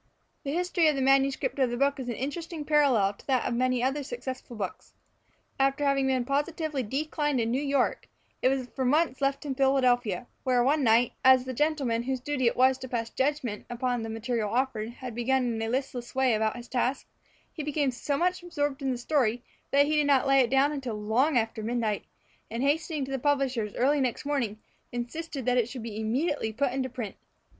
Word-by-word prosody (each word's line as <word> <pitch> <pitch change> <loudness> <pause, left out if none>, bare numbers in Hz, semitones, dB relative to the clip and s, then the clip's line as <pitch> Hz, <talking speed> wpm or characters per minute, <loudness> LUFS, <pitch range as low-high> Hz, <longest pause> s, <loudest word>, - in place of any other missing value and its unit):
The 280 - -3
history 350 0 +2
of 305 - +3
the 270 - -1
manuscript 270 +1 +2
of 260 -2 +3
the 240 - -3
book 280 +1 +1
is 250 -2 -4
an 235 - -2
interesting 310 +4 -5
parallel 265 -10 +3
to - - -20
that 260 -3 +1
of - - 0
many 250 0 +1
other 270 +3 0
successful 260 - -6
books. 195 -4 -6 0.6
After 275 +1 +2
having 275 -1 +2
been 260 -2 +1
positively 295 +1 -1
declined 295 +3 -1
in 230 0 0
New 260 +3 0
York, 280 -3 0 0.3
it - - +4
was 265 -1 0
for 265 - -1
months 285 +1 +2
left 275 +2 0
in 280 - -2
Philadelphia, 250 -6 +2 0.2
where 250 -2 +3
one 285 +3 +2
night, 230 +1 +4
as 260 -1 +6
the 260 - -4
gentleman 275 -5 0
whose 260 +1 -2
duty 260 -1 0
it - - +1
was 260 +1 +4
to 260 - -6
pass 230 -2 -3
judgment 265 -6 -1
upon 245 0 -1
the 225 - -5
material 225 -1 -2
offered 235 -3 -1
had 245 0 -8
begun 255 +2 +1
in 225 - -3
a 225 - -2
listless 250 -1 -3
way 265 -1 +3 0.2
his 240 0 -9
task, 255 +1 -1 0.5
he 315 - -5
became 290 -2 0
so 275 +3 -2
much 360 +3 +1
absorbed 290 -5 -2
in 270 - -1
the 255 - -1
story 245 -2 0 0.3
that 280 +1 +4
he 305 +1 0
did 295 -1 +3
not 275 -2 +4
lay 275 0 +5
it 250 -3 +3
down 270 +2 +3
until 260 -6 -4
long 235 +8 +1
after 225 -1 -1
midnight, 220 -2 -1 0.4
and 230 +3 -3
hastening 300 0 0
to 270 - -8
the 270 - -1
publishers 265 -6 0
early 280 +3 +2
next 255 +2 -1
morning, 260 -8 -1 0.3
insisted 260 +3 -5
that 250 0 +2
it 235 -1 0
should 250 -4 -7
be 220 -2 -5
immediately 250 +3 -1
put 260 +4 0
into 260 0 -2
print. 235 -5 -6
260 Hz, 205 wpm, -28 LUFS, 240-285 Hz, 0.6 s, as